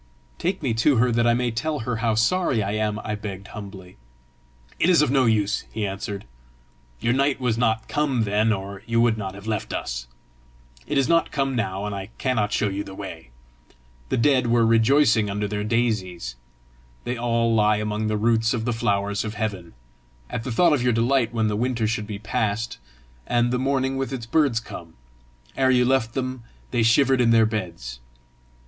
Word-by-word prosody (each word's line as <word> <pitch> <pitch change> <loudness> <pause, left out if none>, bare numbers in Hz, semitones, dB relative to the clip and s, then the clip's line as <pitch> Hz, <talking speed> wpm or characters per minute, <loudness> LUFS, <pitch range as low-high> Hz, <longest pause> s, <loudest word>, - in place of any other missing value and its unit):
"Take 185 0 -2
me 125 -5 +1
to 145 +3 +4
her 125 +1 +3
that 120 0 +2
I 120 - +4
may 120 0 0
tell 150 +6 -2
her 115 0 -2
how 115 -2 +1
sorry 115 - +2
I 100 - -2
am," 105 0 -1
I 105 - -3
begged 100 -2 -6
humbly. 95 -3 -10 0.8
"It 175 - +3
is 170 -4 +5
of 150 - +1
no 135 -2 +3
use," 105 -2 +1
he 110 -2 -2
answered. 100 0 -5 0.7
"Your 120 - +1
night 140 +1 +1
was 125 -4 0
not 110 -2 0
come 140 -6 0
then, 105 +2 +2
or 100 -1 -4
you 115 0 +1
would 115 -1 +4
not 100 -3 -5
have 100 +1 -11
left 110 -3 -3
us. - - -4 0.8
It - - -1
is 135 - +3
not 165 +1 +3
come 135 -2 -1
now, 100 -3 -2
and 105 - -3
I 100 +1 -6
cannot 115 -6 0
show 105 - +1
you 100 +1 -3
the 95 -1 -10
way. 85 -10 -8 0.8
The - - 0
dead 130 0 +3
were 115 -1 +3
rejoicing 115 -1 +4
under 105 +1 -2
their 105 0 -3
daisies 105 - -1 0.7
they 125 - -2
all 115 -1 +1
lie 105 -1 +3
among 105 0 -2
the 110 0 0
roots 115 +1 +2
of 110 -2 -3
the 120 - 0
flowers 100 -3 0
of 110 -1 -5
heaven 100 -6 -4 0.6
at 115 - -3
the 125 - -4
thought 165 +8 +4
of 140 - +1
your 125 -1 +2
delight 120 +1 +2
when 110 -2 0
the 105 - -1
winter 120 0 0
should 105 -1 -2
be 105 -2 -5
past, 110 - -2 0.5
and 120 0 +2
the 125 - +1
morning 135 0 0
with 135 0 -2
its 125 -4 -4
birds 135 -2 +2
come: 85 -7 -10 0.6
ere 130 -1 +2
you 125 -1 +4
left 120 -3 +1
them, 130 -2 -3 0.3
they 120 - +1
shivered 130 +3 +4
in 120 - +3
their 115 -1 +5
beds. 85 - -4
115 Hz, 195 wpm, -24 LUFS, 105-125 Hz, 0.8 s, is